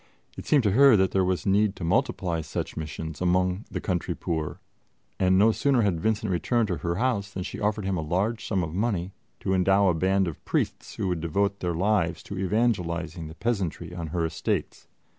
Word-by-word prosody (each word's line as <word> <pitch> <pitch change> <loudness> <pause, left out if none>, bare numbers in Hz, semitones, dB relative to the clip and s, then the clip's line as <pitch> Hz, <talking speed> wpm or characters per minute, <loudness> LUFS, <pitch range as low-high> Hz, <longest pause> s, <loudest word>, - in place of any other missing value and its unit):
It - - -9
seemed 145 -4 +4
to 105 - +3
her 135 +1 +7
that 95 -1 +2
there 95 - +2
was 90 -3 -1
need 100 +1 +3
to - - -7
multiply 85 0 0
such - - -4
missions 80 0 -6
among 90 +2 +1
the - - -4
country 90 -3 -2
poor, 80 -3 -3 0.6
and 95 0 +4
no 110 +3 +6
sooner 130 0 +2
had 95 -5 +1
Vincent 110 -1 0
returned 105 +6 +1
to 90 - -1
her 85 0 -2
house 105 -2 0
than 95 -2 -5
she - - -6
offered 105 -1 -1
him 95 -1 0
a - - -1
large 100 +9 -1
sum 95 -4 0
of 80 -1 -4
money 95 -2 -1 0.3
to 95 - 0
endow 95 +1 +4
a - - +3
band 95 +3 +2
of 85 - -6
priests - - -2
who 95 - -2
would 90 -3 -1
devote 100 +5 0
their 85 -2 -2
lives 90 -3 +1
to 100 -2 -6
evangelizing 90 -6 -1
the 80 - -10
peasantry 90 -6 -2
on 85 -2 -5
her 85 +1 -1
estates. 80 -1 -3
95 Hz, 205 wpm, -26 LUFS, 85-105 Hz, 0.6 s, her